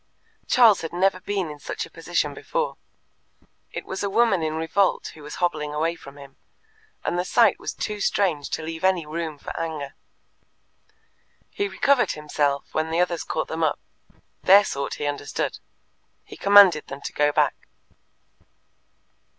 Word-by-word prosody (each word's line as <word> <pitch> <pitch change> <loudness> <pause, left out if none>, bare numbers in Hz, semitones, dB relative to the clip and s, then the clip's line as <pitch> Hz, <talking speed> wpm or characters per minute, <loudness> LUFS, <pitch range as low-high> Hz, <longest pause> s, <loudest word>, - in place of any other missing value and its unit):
Charles 230 -6 +5
had 165 - -6
never 185 +1 +2
been 190 -4 -3
in 150 - -10
such - - -5
a - - -15
position - - -2
before. - - -3 1.0
It - - -6
was 190 - -5
a 200 - -1
woman 215 -3 +3
in 155 0 -2
revolt 165 +5 0
who 155 - -14
was 150 +1 -8
hobbling 150 -4 -1
away 160 +2 0
from 140 -4 -13
him, 140 -1 -13 0.7
and 175 - 0
the - - +1
sight 225 +1 +3
was - - -4
too 210 -1 -4
strange 170 -9 0
to - - -3
leave 160 +1 -6
any 185 -4 +2
room 160 0 -4
for - - -8
anger. 155 -4 -4 1.6
He 405 - -1
recovered 280 -9 +2
himself 145 -2 -2
when 155 +1 -1
the 165 +1 0
others 175 -1 0
caught 155 - -3
them 160 +1 -3
up: 155 - +1 0.6
their 200 +2 +7
sort 140 -5 -3
he 145 - -4
understood. 145 0 -3 0.6
He - - -12
commanded 200 -6 +6
them 135 +1 -8
to - - -6
go 145 0 +2
back. - - 0
165 Hz, 160 wpm, -24 LUFS, 150-195 Hz, 1.6 s, their